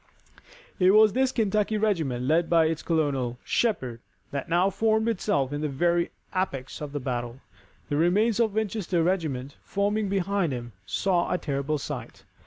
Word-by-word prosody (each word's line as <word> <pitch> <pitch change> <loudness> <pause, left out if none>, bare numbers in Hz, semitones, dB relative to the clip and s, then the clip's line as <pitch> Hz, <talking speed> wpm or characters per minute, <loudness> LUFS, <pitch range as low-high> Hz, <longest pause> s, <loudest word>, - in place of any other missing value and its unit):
It 185 +2 +5
was 215 -1 +6
this 260 +1 +2
Kentucky 215 -2 +1
regiment, 165 - 0
led 165 +4 +2
by 165 -1 +5
its 160 0 -1
colonel, 140 -7 0
Shepherd, 130 - -1 0.3
that 140 -1 -4
now 180 +3 +3
formed 220 +2 +1
itself 145 - 0
in 145 - -3
the 155 - -1
very 170 +5 +1 0.3
apex 140 -10 -3
of 150 -1 -5
the 145 - -3
battle. 120 -1 -4 0.5
The 145 - -1
remains 205 +8 +3
of 225 -2 +3
the - - -13
Winchester 205 -5 0
regiment, 155 -7 -1
forming 205 +1 -1
behind 195 -4 0
it, 120 -1 -4 0.2
saw 185 -3 +1
a - - +2
terrible 145 -1 -2
sight. 140 - -7
170 Hz, 165 wpm, -26 LUFS, 140-205 Hz, 0.5 s, was